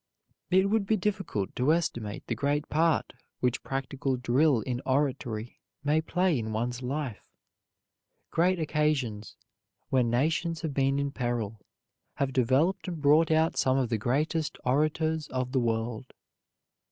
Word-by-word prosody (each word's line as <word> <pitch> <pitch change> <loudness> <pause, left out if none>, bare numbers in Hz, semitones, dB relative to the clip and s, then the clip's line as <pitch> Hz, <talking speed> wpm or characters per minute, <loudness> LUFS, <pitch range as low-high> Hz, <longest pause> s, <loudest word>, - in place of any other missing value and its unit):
It 190 +1 +4
would 215 -3 +1
be 220 - +3
difficult 190 - -2
to 130 +5 +2
estimate 120 -11 -1
the - - -2
great 145 +1 0
part 160 +1 +1 0.3
which 125 -1 0
practical 135 0 -2
drill 125 +1 +3
in 125 0 -3
oratory 130 -5 -1 0.2
may 150 +2 +2
play 175 -2 +1
in 110 -1 -4
one's 120 +3 -2
life. 130 -3 -4 1.0
Great 180 +2 +2
occasions, 150 -9 -1 0.6
when 125 -3 +3
nations 160 +6 0
have 160 -4 -3
been 135 0 +2
in 140 0 -1
peril, 115 -5 -3 0.5
have 135 -1 -1
developed 135 - +2
and 170 -3 -4
brought 150 +3 +4
out 160 +1 +2
some 130 0 +3
of 130 -3 0
the 115 - 0
greatest 150 +7 0
orators 155 +3 +1
of 130 -1 -3
the 130 - +2
world. 115 +1 -2
140 Hz, 140 wpm, -28 LUFS, 125-160 Hz, 1.0 s, It